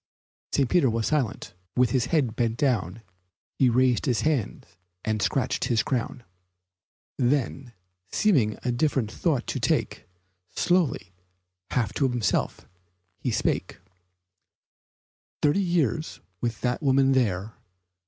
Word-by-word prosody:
St. 135 - +2
Peter 145 -2 +3
was 115 -1 -1
silent. 130 -8 -1 0.2
With 125 -2 +3
head 130 -1 +1
bent 115 -1 0
down 115 - 0 0.6
He 130 - +5
raised 125 +2 +2
his 125 -4 +1
hand 150 -9 -1 0.4
and 110 -1 0
scratched 130 +3 0
his 120 -3 +1
crown; 125 -1 -3 1.0
Then, 130 -1 0 0.4
seeming 135 - +2
a 125 - 0
different 120 -3 0
thought 140 -2 0
to - - -3
take, - - -1 0.5
Slowly, 150 - +1 0.6
half 115 -4 0
to 135 -2 +1
himself, 120 -4 -1 0.5
he - - -2
spake: - - -1 1.7
"Thirty 150 +7 +3
years 160 - 0 0.2
with 115 -2 -2
that 125 +2 -1
woman 135 -1 +3
there? 110 -5 0
125 Hz, 115 wpm, -26 LUFS, 115-140 Hz, 1.7 s, He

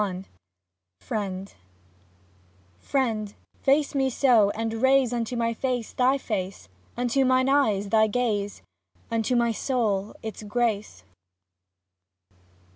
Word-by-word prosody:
XXXI 190 -2 -3 0.7
FRIEND 195 -2 -4 1.3
Friend, 220 - -1 0.2
face 280 +2 +2
me 270 -2 +1
so 235 -5 +4
and 225 +1 -3
raise 265 -2 +4
Unto 235 0 -2
my 230 -1 0
face 245 -1 -3
thy 260 +2 +3
face, 190 - -4 0.3
Unto 245 +2 +1
mine 255 0 +3
eyes 220 -8 +2
thy 220 +1 +4
gaze,, 210 -3 -1 0.5
Unto 230 +2 0
my 235 -1 +2
soul 215 -5 -1
its 220 -1 -6
grace. 210 - -2
230 Hz, 110 wpm, -26 LUFS, 205-255 Hz, 1.3 s, so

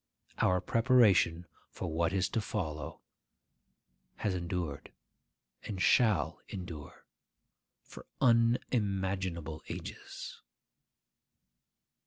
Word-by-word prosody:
Our 90 -1 +3
preparation 105 -7 +4 0.2
for - - -5
what 85 +1 +1
is 95 -1 +1
to 115 - 0
follow 80 - -4 1.1
has 100 - -1
endured, 85 -4 -3 0.7
and 100 -3 -5
shall 110 +1 +3
endure, 85 -6 -8 0.8
for - - -12
unimaginable 95 - +1
ages. - - -7
95 Hz, 75 wpm, -32 LUFS, 85-110 Hz, 1.1 s, preparation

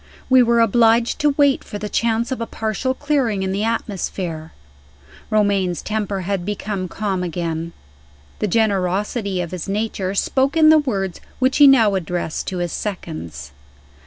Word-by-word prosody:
We 260 -1 +7
were 235 -1 +3
obliged 230 +2 +3
to 295 -2 +2
wait 285 -2 +3
for 205 - -7
the 210 - -5
chance 230 +3 0
of 255 - -3
a 230 - -3
partial 225 +4 -2
clearing 260 -10 0
in 190 - -1
the 200 +2 -1
atmosphere. 185 -7 -3 0.8
Romayne's 200 -4 +1
temper 210 -2 -2
had 190 0 -2
become 200 -1 -3
calm 195 0 -2
again. 170 -1 -3 0.7
The 210 - 0
generosity 200 -1 0
of 170 - -5
his 185 +1 -5
nature 200 -2 -2
spoke 270 +8 +1
in 310 -1 +7
the 315 0 +7
words 195 - -3 0.2
which 260 +1 +1
he 290 -1 +8
now 230 -7 +5
addressed 175 -3 -3
to 185 - -3
his 175 -1 -2
seconds. 85 - -6
205 Hz, 160 wpm, -20 LUFS, 185-235 Hz, 0.8 s, he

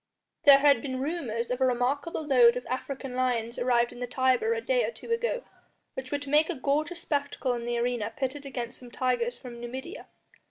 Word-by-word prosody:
There 280 -1 +10
had 280 -4 +4
been 260 -2 -4
rumours 260 -6 -2
of 250 +1 -2
a - - +5
remarkable 275 +6 -1
load 250 -4 +6
of 250 - -6
African 260 +1 -4
lions 245 -2 -1
arrived 240 -1 +2
in 245 - -11
the 245 - -3
Tiber 260 - +2
a - - -1
day - - +1
or - - 0
two 470 - -9
ago, 475 +1 0 0.5
which 260 -1 -6
were 290 - +1
to 285 -1 -7
make 305 +2 +4
a 350 - -1
gorgeous 305 +6 -1
spectacle 285 -3 -1
in 235 -1 -4
the 240 0 -1
arena 235 -2 -1
pitted 275 +1 -3
against 245 -3 -5
some 245 - -11
tigers 245 -1 -1
from 240 -2 -10
Numidia. 260 +8 -7
260 Hz, 205 wpm, -28 LUFS, 245-290 Hz, 0.5 s, There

